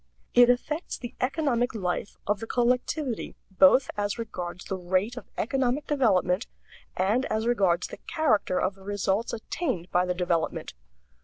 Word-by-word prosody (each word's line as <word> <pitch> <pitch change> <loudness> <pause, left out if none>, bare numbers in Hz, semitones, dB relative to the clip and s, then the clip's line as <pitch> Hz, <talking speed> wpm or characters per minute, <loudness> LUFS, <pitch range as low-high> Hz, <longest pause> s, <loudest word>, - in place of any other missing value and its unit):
It 245 0 +7
affects 300 +7 0
the 240 0 -7
economic 255 -4 0
life 185 -1 -3
of 205 -1 0
the 225 - -6
collectivity 250 +2 0 0.2
both 190 +7 +5
as 205 +1 -1
regards 180 -6 -5
the 190 - -3
rate 185 +6 0
of 245 - -9
economic 265 +3 0
development 205 -8 +2 0.5
and 210 +8 +2
as 220 +1 -1
regards 195 -8 +2
the - - -8
character 230 - +1
of 190 - 0
the 195 - -19
results 205 +2 -1
attained 220 - -3
by 180 +1 +2
the 180 - 0
development. 175 -2 -1
220 Hz, 150 wpm, -27 LUFS, 185-250 Hz, 0.5 s, It